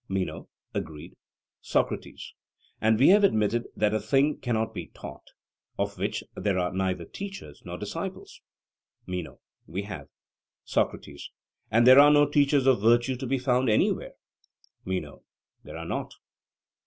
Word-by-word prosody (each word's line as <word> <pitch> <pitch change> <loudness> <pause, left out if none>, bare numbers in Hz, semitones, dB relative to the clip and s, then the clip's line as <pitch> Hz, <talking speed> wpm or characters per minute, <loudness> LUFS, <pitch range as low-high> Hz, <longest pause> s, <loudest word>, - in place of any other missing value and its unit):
MENO: 95 -1 -3 0.2
Agreed. 75 -2 -6 0.5
SOCRATES: - - -2 0.5
And 110 0 +3
we 135 +7 +6
have 205 +2 +6
admitted 115 - +2
that 105 0 +1
a 110 - +1
thing 140 +4 +1
cannot 115 -3 -1
be 90 -5 -6
taught - - -11 0.5
of - - -2
which - - -2
there 100 -3 0
are 90 0 -1
neither 95 -2 -1
teachers 195 - -8
nor - - -6
disciples? - - -6 0.6
MENO: 90 -2 -5 0.3
We 95 +4 -4
have. 100 -2 -8 0.6
SOCRATES: - - -2 0.4
And 115 +2 +4
there 130 +2 +9
are 145 +1 +9
no 145 0 +5
teachers 145 -1 +3
of 130 -6 +4
virtue 120 +4 +3
to 130 +1 -5
be 135 +2 +1
found 125 -1 +1
anywhere? 110 - +1 0.7
MENO: 95 0 -4 0.4
There - - -9
are - - -6
not. - - -4
115 Hz, 140 wpm, -27 LUFS, 95-135 Hz, 0.7 s, there